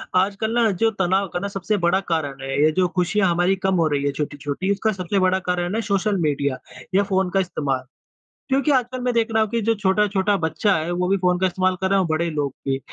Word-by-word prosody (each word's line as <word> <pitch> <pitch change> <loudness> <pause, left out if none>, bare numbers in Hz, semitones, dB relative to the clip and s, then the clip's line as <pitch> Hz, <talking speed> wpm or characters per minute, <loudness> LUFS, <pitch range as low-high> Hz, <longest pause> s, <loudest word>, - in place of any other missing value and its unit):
आजकल 200 +4 +1
ना 230 -2 +4
जो 225 +4 +1
तनाव 190 +2 +1
का 200 +3 -3
सबसे 200 +1 -2
बड़ा 180 +1 +2
कारण 140 -4 -3
है, 135 +1 -1
ये 155 - +5
जो 180 +3 +2
खुशियाँ 185 +2 +1
हमारी 175 +3 +2
कम 190 - +2
हो 165 -3 +2
रही 145 -2 -1
है 140 - +1
छोटी-छोटी 145 +5 -3
उसका 205 +2 +1
सबसे 190 0 -2
बड़ा 185 0 +2
कारण 180 +2 -1
है, 225 - 0
सोशल 200 -1 0
मीडिया 140 -3 0 0.4
या 200 - +4
फ़ोन 190 -2 0
का 195 - +1
इस्तेमाल। 140 -8 -2 0.6
क्योंकि 275 +3 +2
आजकल 255 -1 0
मैं 250 0 0
देख 230 -1 +2
रहा 220 - +3
हूँ 220 - 0
कि 235 - -1
जो 230 - +4
छोटा-छोटा 205 0 +1
बच्चा 160 +4 +1
है, 160 +2 -3
वो 180 +1 -1
भी 195 - +3
फ़ोन 180 -1 +1
का 190 - +3
इस्तेमाल 185 +1 0
कर 190 - +1
रहे 195 - +2
हैं - - +3
और - - -3
बड़े 165 +2 0
लोग 145 -4 -2
भी 135 0 0
185 Hz, 240 wpm, -22 LUFS, 160-200 Hz, 0.6 s, ये